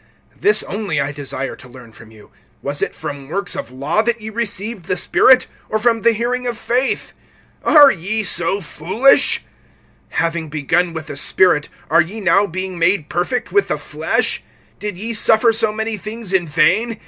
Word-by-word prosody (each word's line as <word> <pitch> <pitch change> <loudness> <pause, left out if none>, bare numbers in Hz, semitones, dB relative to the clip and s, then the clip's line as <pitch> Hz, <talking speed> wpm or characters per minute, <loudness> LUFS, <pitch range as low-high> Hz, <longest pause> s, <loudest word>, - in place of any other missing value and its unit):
(2)This 420 - +2
only 195 -6 -2
I 140 +1 -1
desire 135 -2 -5
to - - -15
learn 125 -2 -14
from 110 0 -15
you: 110 -2 -18 0.3
Was 145 +1 -3
it - - -2
from 145 -3 -7
works 195 +2 -2
of - - -5
law 140 +10 -1
that 235 +1 -1
ye 220 0 -8
received 215 -3 -3
the 185 -1 -1
Spirit, 260 +7 +4 0.2
or 220 - 0
from 230 0 +1
the 235 - +4
hearing 245 +3 -2
of 240 -2 -2
faith? 250 +3 -1 0.5
(3)Are 290 -3 +7
ye 205 +5 -3
so 185 +1 +2
foolish? 190 - +2 0.7
Having 165 -1 -2
begun 165 +4 0
with 160 -1 -6
the 150 - -8
Spirit, 150 -1 +2 0.2
are 165 +3 +4
ye 190 +8 -5
now 200 +1 +3
being 185 0 -5
made 170 -2 +1
perfect[3:3] 175 +8 -2
with 405 0 +2
the - - -1
flesh? - - -1 0.4
(4)Did 210 -3 -5
ye 225 +4 -4
suffer 225 +1 +4
so 220 -1 +2
many 220 0 -2
things 215 0 -6
in 180 -3 +1
vain? 220 +9 +1
190 Hz, 180 wpm, -18 LUFS, 160-225 Hz, 0.7 s, 3)Are